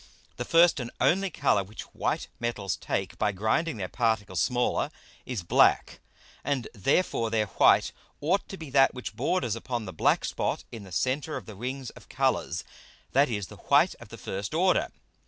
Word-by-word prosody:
The 120 - -3
first 170 +1 +5
and 120 -2 -4
only 195 +2 +3
Colour 100 - +2
which 105 +4 -9
white - - -1
Metals 110 -6 -2
take - - -3
by 105 - +2
grinding 110 - 0
their 95 -3 -3
Particles 110 -5 0
smaller, 125 -1 +1 0.4
is 120 -8 -3
black, - - +3 0.4
and 135 -3 -1
therefore 115 - +1
their 110 -1 +1
white 100 - +4 0.3
ought 180 +7 0
to 195 - -7
be 160 -5 -9
that 135 -1 +5
which 125 - -6
borders 165 - 0
upon 120 0 -4
the 95 - -7
black - - +2
Spot - - -2
in 110 -4 -8
the 95 - -13
Center 135 - -1
of 120 - -8
the 110 - -9
Rings 125 +4 -5
of - - -16
Colours, - - 0 0.5
that 140 +1 +4
is, 105 -4 -2
the - - -12
white - - +3
of - - -12
the - - -9
first 100 +9 -5
order. 185 +2 +3
120 Hz, 180 wpm, -28 LUFS, 105-145 Hz, 0.5 s, first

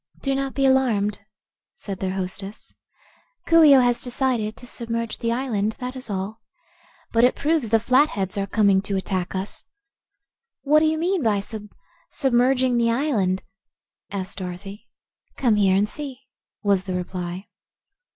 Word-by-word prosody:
"Do 275 - +1
not 270 0 -2
be 275 - +2
alarmed," 235 -6 +2 0.6
said 195 -2 -7
their 190 0 -2
hostess. 195 +2 -6 0.7
"Coo 330 0 +6
ee 290 -3 +8
oh 260 - +7
has 245 -1 +2
decided 245 -4 -1
to - - -11
submerge 230 -1 -3
the 230 - -1
island, 225 -4 -1
that 250 0 -5
is 255 -3 -4
all. 200 +3 -4 0.7
But 230 0 +3
it 250 - +4
proves 295 -5 0
the 225 +1 +4
Flatheads 230 -6 +2
are 200 -1 -2
coming 200 -1 +3
to 200 0 -2
attack 185 -1 -2
us." 190 +2 -4 1.0
"What 300 +2 +5
do 310 - +2
you 315 0 +1
mean 355 +2 0
by 215 -5 +2
sub 210 +1 -7 0.4
sub 270 -3 -1
merging 250 0 +3
the 230 0 +2
island?" 230 -8 0 0.7
asked 195 0 -5
Dorothy. 195 +4 -7 0.5
"Come 235 -5 +2
here 195 -2 +4
and 200 +2 +2
see," 270 +1 -7 0.4
was 200 -2 +2
the 185 -2 -3
reply. 180 +1 -4
225 Hz, 160 wpm, -23 LUFS, 195-260 Hz, 1.0 s, ee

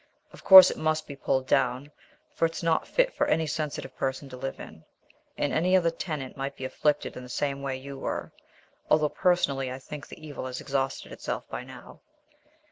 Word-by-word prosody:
Of - - -14
course 190 -1 +11
it - - -6
must 155 0 0
be 140 - -8
pulled 135 -1 0
down, 130 +2 +1 0.4
for 165 - +2
it's 165 +1 -7
not 165 -1 +1
fit - - +2
for - - 0
any 160 +1 +2
sensitive 155 -1 -4
person 135 +1 -3
to 130 - -8
live 135 +1 -5
in, - - -11 0.5
and 145 - -1
any 180 +4 +3
other 170 -2 +2
tenant 155 -6 -5
might 135 0 -4
be 130 - -6
afflicted 150 +3 0
in - - -7
the 125 - -11
same 140 +2 -2
way 135 -1 -3
you 135 +1 -9
were. - - -4 0.6
Although, 155 -1 +4
personally, 140 -9 +1
I 130 - -5
think 145 +2 -9
the - - -11
evil 135 -3 -6
has 125 0 -5
exhausted 135 -1 -2
itself - - -5
by - - -5
now." 130 0 -13
140 Hz, 200 wpm, -27 LUFS, 130-155 Hz, 0.6 s, course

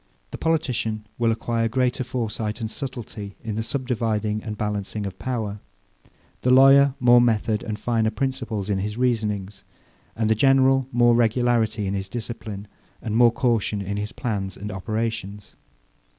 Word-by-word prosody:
The - - -6
politician 125 -9 -1
will 115 -1 +3
acquire 115 0 0
greater 125 +2 0
foresight 115 -4 -3
and 110 -1 -3
subtility, 115 -7 -6
in 110 -2 -3
the 110 - -2
subdividing 110 -4 -1
and 105 -1 -6
balancing 105 0 -3
of 95 -1 -7
power; 110 -5 -3 0.8
the 125 - +1
lawyer 135 +1 +7
more 120 -1 +6
method 110 -2 +1
and 110 -3 -4
finer 110 0 +1
principles 115 -4 -3
in 100 -2 0
his 105 +3 -3
reasonings; 105 -5 -1 0.5
and 110 -1 0
the 110 - +4
general 135 +2 +4
more 120 0 +4
regularity 115 -2 +2
in 95 - -2
his 95 -1 -3
discipline, 110 -3 -6 0.3
and 110 -1 -4
more 120 0 +6
caution 115 -4 0
in 100 +1 -3
his 105 +1 -3
plans 100 -5 -3
and 105 +2 -6
operations. 105 0 -4
110 Hz, 150 wpm, -24 LUFS, 105-120 Hz, 0.8 s, lawyer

